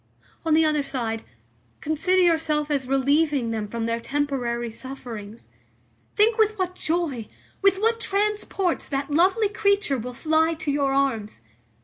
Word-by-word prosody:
On 320 -1 +3
the 320 0 +4
other 305 -1 +2
side, 230 -5 -3 0.6
consider 350 +5 +1
yourself 315 -3 +1
as 270 -3 0
relieving 275 -1 +2
them 220 -2 -3
from 230 +2 -3
their 230 0 -1
temporary 245 -4 -2
sufferings. 230 - -8 0.7
Think 440 +2 +3
with 435 0 +3
what 365 -1 -1
joy, 315 -10 -2 0.3
with 395 -1 +4
what 455 +2 +1
transports 405 -3 0
that 275 +1 -2
lovely 380 +8 +3
creature 400 - +1
will 250 +2 -6
fly 320 +3 +2
to 315 -2 -3
your 280 -1 +1
arms. 230 - -1
295 Hz, 140 wpm, -24 LUFS, 250-360 Hz, 0.7 s, the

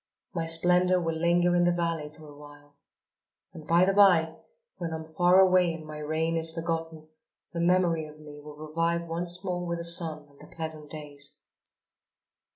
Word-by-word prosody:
My 165 -2 -3
splendour 180 +2 +4
will 165 -2 -2
linger 175 +2 +1
in 175 - +3
the 175 - +3
valley 165 -3 -2
for 155 0 -16
a 145 - -13
while. 145 0 -16 0.8
And 155 -1 -12
by 170 +2 +4
the 195 - +1
by, 175 -5 +4 0.4
when 170 -2 -5
I - - -2
am 160 0 -10
far 180 +3 +4
away 185 -3 +4
and 160 -1 -10
my 155 0 -9
reign 160 +2 -2
is 165 0 +1
forgotten, 165 -1 -4 0.5
the 170 - -4
memory 170 -2 +1
of 150 0 -15
me 150 -1 -12
will 150 0 -12
revive 165 +3 -2
once 175 +3 -1
more 180 -1 -3
with 170 -1 -3
the 170 - -6
sun 165 -3 +1
and 140 -1 -24
the - - -14
pleasant 155 -2 -7
days." 145 -2 -7
165 Hz, 185 wpm, -27 LUFS, 155-175 Hz, 0.8 s, splendour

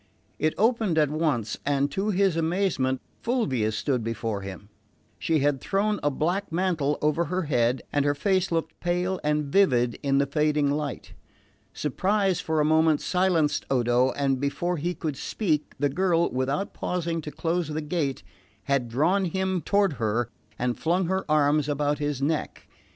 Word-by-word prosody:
It 155 0 +1
opened 220 -6 +2
at 150 -2 +3
once, 145 -9 -1
and 140 0 +1
to 195 +7 -1
his 195 -3 +2
amazement 165 -6 0 0.2
Fulvia 135 - 0
stood 125 +2 -1
before 110 -2 -3
him. 95 0 -8 0.5
She 160 -3 +1
had 140 -1 +1
thrown 205 +1 0
a 145 - +2
black 170 +8 -1
mantle 165 -5 0
over 155 +3 +2
her 185 +2 -1
head, 125 -4 +1
and 145 - +2
her 145 0 +1
face 185 +4 +1
looked 165 -1 -2
pale 180 +2 -1
and 150 0 +1
vivid 130 -8 +2
in 135 -1 +1
the 140 - +3
fading 150 0 +1
light. 145 -2 -4 0.6
Surprise 190 +5 0
for 160 -1 -1
a 150 - +3
moment 160 0 +4
silenced 180 -5 +1
Odo, 125 0 +3
and 135 -2 0
before 175 +5 -1
he 175 +4 -2
could 150 -5 -4
speak 155 -3 -2
the 145 +1 +2
girl, 170 +3 +1
without 135 +9 -1
pausing 170 -2 -2
to 150 - -6
close 170 +2 -1
the 155 0 -3
gate, 150 - -2 0.4
had 135 -2 0
drawn 170 +11 +2
him 190 0 -1
toward 200 -2 +2
her 115 +2 0 0.3
and 125 0 -1
flung 175 +3 +1
her 190 +2 -1
arms 150 0 +3
about 145 0 0
his 145 -2 -2
neck. 155 +2 -2
150 Hz, 165 wpm, -26 LUFS, 140-180 Hz, 0.6 s, moment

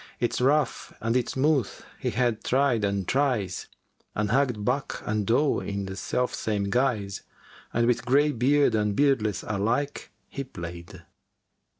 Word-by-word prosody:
Its 120 +1 0
rough 145 +3 +1
and 115 +2 -1
its 125 -2 0
smooth 135 -4 +2 0.3
he - - -1
had 120 -2 0
tried 130 -4 +2
and 100 -2 -1
tries 125 -10 0 0.2
* - - -42
And 105 0 0
hugged 125 -5 +1
buck 135 +3 -1
and 105 -2 -1
doe 135 +5 +3
in 100 -1 -4
the 95 0 -6
self 125 +6 -1
same 100 -2 -1
guise 115 -6 0 0.5
And 120 0 +2
with 120 0 +1
greybeard 140 0 +3
and 105 -2 +1
beardless 120 -8 +2
alike 115 +8 -1 0.2
he 140 - -5
play'd." 85 -8 -9
120 Hz, 150 wpm, -26 LUFS, 105-135 Hz, 0.5 s, doe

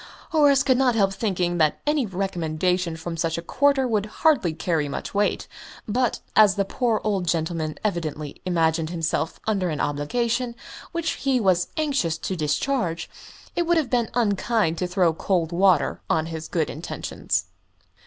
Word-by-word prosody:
Horace 285 -3 +5
could 260 -2 +3
not 255 -3 +3
help 195 -3 +2
thinking 180 -5 -1
that 155 -2 +2
any 295 -5 +1
recommendation 180 -2 -1
from 165 +1 -5
such 165 -1 -1
a - - -3
quarter 275 +6 +2
would 215 -3 0 0.2
hardly 265 - +4
carry 160 -2 -1
much - - -5
weight; 205 +1 0 0.4
but, 245 +3 0
as 210 -3 +6
the 200 - +1
poor 230 +1 0
old 195 -5 0
man 160 -2 -2
evidently 155 -7 -3
imagined 165 -3 +1
himself 165 -1 -2
under 195 -5 0
an 150 -2 -3
obligation, 235 - -1 0.4
which 335 -1 -1
he 270 -2 0
was 185 -5 +2
anxious 275 - 0
to 185 - -3
discharge, 170 - -1 0.4
it 345 -1 0
would 345 0 +3
have 305 -5 0
been 240 -3 +1
unkind 210 -5 +1
to 180 - 0
throw 180 -2 +2
cold 170 -1 0
water 180 -3 +3
on 160 0 +2
his 160 -1 -6
good 160 -3 -1
intentions. 100 - -3
185 Hz, 160 wpm, -24 LUFS, 165-235 Hz, 0.4 s, as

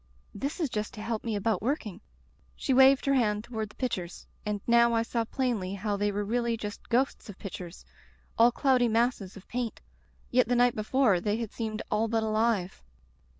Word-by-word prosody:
'This 280 - -4
is 315 - +2
just 210 0 -3
to 210 - -7
help 225 -1 -3
me 225 -2 -2
about 205 -1 0
working.' 225 - -2 0.5
She - - -1
waved 265 +1 +6
her 275 - +3
hand 210 -5 +1
toward 220 -3 -4
the - - -18
pictures, 220 -9 -4 0.2
and 210 -1 -2
now 235 0 +5
I 225 - +2
saw 230 0 -1
plainly 220 -7 -2
how 205 +1 -2
they 205 +1 0
were 205 +1 -2
really 235 +1 0
just 210 0 -7
ghosts 250 -1 0
of 200 - -9
pictures 180 -3 -8 0.3
— - - -25
^all 235 +1 +7
cloudy 255 -1 +3
masses 225 -4 0
of 195 - -14
paint. 240 -2 -3 0.5
Yet 250 -1 +4
the 245 - +2
night 245 0 +4
before 215 -2 +2
they 210 +2 0
had 230 -3 -4
seemed 220 -2 -4
all 215 +2 +2
but 225 0 0
alive. 215 -4 0
225 Hz, 195 wpm, -29 LUFS, 210-245 Hz, 0.5 s, ^all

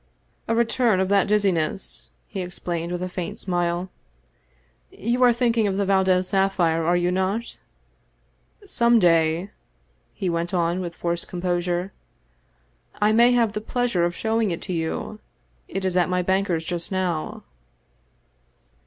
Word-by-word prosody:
" - - -41
A 230 - +1
return 235 -3 +2
of 190 0 0
that 200 -1 +3
dizziness," 195 -4 0 0.2
he 195 - -5
explained 175 -1 -4
with 180 0 -3
a - - -2
faint 180 -1 -5
smile. 175 0 -2 0.5
" - - -39
You 240 +3 -2
are 250 -1 +7
thinking 235 -2 +1
of 195 -1 -1
the 200 - +1
Valdez 190 -1 +2
sapphire, 185 -4 +2
are 175 +2 +2
you 175 0 +1
not? 190 +5 -2 1.1
Some 235 0 +3
day," 165 0 +2 0.6
he 195 - -3
went 170 +2 -1
on 170 +1 +1
with 175 -2 -5
forced 170 0 -2
composure, 175 +1 -2 0.6
" - - -37
I 210 +1 +3
may 235 +3 +5
have 230 -3 +2
the 210 - -3
pleasure 235 -5 0
of 175 0 0
showing 225 -1 0
it 170 - -4
to 185 - -4
you. 165 +6 -3 0.5
It 195 0 -4
is 185 -1 0
at 180 0 +3
my 180 0 +1
banker's 190 -3 0
just 175 +1 -3
now." 180 -4 -2
185 Hz, 155 wpm, -23 LUFS, 175-205 Hz, 1.1 s, are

